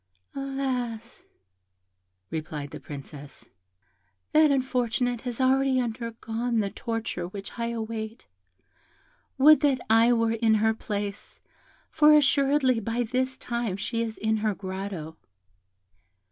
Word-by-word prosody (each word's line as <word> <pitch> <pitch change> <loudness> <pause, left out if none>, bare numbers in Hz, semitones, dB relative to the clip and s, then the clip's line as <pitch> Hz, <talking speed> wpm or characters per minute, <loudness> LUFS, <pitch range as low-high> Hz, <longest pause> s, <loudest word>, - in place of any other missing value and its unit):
"Alas!" 255 -4 -3 1.1
replied 155 -2 -5
the - - -7
Princess, 145 0 -10 0.8
"that 310 0 +5
unfortunate 245 -3 0
has 245 -2 -5
already 265 0 +3
undergone 230 0 -2
the 200 -2 -1
torture 225 -6 -4
which 195 +2 -8
I 235 - -1
await; 225 -1 -5 1.1
would 300 +3 +7
that 280 -3 +2
I 225 +2 +6
were 230 -1 +2
in 225 -1 +3
her 220 +1 +3
place, 205 -2 -5 0.5
for 300 -1 +6
assuredly 275 -3 +3
by 230 +3 -1
this 255 +3 -1
time 235 -7 -3
she 230 +3 -2
is 225 -1 -3
in 220 0 0
her 215 -1 0
grotto." 185 -4 -6
230 Hz, 115 wpm, -26 LUFS, 215-255 Hz, 1.1 s, would